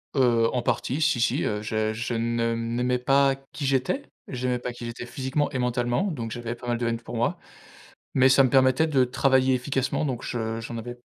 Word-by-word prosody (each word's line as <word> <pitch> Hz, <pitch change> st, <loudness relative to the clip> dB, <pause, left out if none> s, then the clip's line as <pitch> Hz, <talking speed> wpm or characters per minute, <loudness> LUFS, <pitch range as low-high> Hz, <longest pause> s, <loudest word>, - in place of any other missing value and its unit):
Heu, 120 Hz, -4 st, +3 dB
en 125 Hz, -1 st, -1 dB
partie, 135 Hz, +5 st, -1 dB
si, 155 Hz, -6 st, +2 dB
si, 115 Hz, -, +1 dB
heu, 105 Hz, 0 st, -1 dB
je 110 Hz, 0 st, -1 dB
je 120 Hz, +2 st, -3 dB
ne 115 Hz, 0 st, 0 dB
m'aimais 120 Hz, +2 st, 0 dB
pas, 135 Hz, +1 st, +3 dB, 0.2 s
qui 145 Hz, -, -5 dB
j'étais. 135 Hz, -, 0 dB, 0.2 s
J'aimais 125 Hz, -1 st, -1 dB
pas 125 Hz, -, -4 dB
qui 120 Hz, -, -8 dB
j'étais 115 Hz, 0 st, -6 dB
physiquement 130 Hz, +4 st, -2 dB
et 130 Hz, -, -2 dB
mentalement, 120 Hz, +4 st, 0 dB
donc 115 Hz, -7 st, -5 dB
j'avais 120 Hz, 0 st, -4 dB
pas 120 Hz, +1 st, -10 dB
mal 120 Hz, -1 st, 0 dB
de 120 Hz, 0 st, -1 dB
haine 115 Hz, 0 st, -1 dB
pour 120 Hz, -, -8 dB
moi. 115 Hz, +1 st, 0 dB, 0.8 s
Mais 130 Hz, 0 st, +5 dB
ça 135 Hz, +1 st, +6 dB
me 130 Hz, -, +3 dB
permettait 130 Hz, +4 st, +4 dB
de 135 Hz, -4 st, +3 dB
travailler 130 Hz, +1 st, +2 dB
efficacement 130 Hz, +3 st, -1 dB
donc 130 Hz, -4 st, -3 dB
je 115 Hz, -1 st, -3 dB
j'en 115 Hz, +1 st, -6 dB
avais 120 Hz, +2 st, -6 dB
125 Hz, 210 wpm, -25 LUFS, 115-130 Hz, 0.8 s, ça